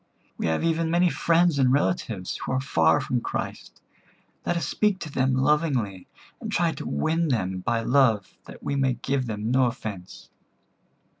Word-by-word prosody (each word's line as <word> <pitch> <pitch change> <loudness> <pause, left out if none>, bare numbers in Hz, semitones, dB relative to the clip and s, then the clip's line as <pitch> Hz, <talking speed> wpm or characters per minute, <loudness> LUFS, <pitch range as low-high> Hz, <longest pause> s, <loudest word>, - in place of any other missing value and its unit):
We - - -2
have 80 0 0
even 165 0 +1
many 175 +1 +3
friends 170 -2 +2
and 130 -2 +4
relatives 135 - -1
who - - -3
are 130 - +1
far 80 - +3
from 125 -1 -1
Christ. - - -5 0.6
Let 175 - +1
us 170 - -2
speak 210 -3 +1
to 155 - -6
them 130 -1 +1
lovingly, 130 - 0 0.3
and - - -6
try - - +2
to - - -7
win 160 - 0
them 95 -9 -1
by 115 +4 -1
love 115 -6 +2
that - - -12
we 140 - -2
may 135 -2 +2
give 135 -1 -2
them 110 +1 -3
no 130 0 +4
offence." 105 -7 -7
130 Hz, 170 wpm, -25 LUFS, 110-160 Hz, 0.6 s, and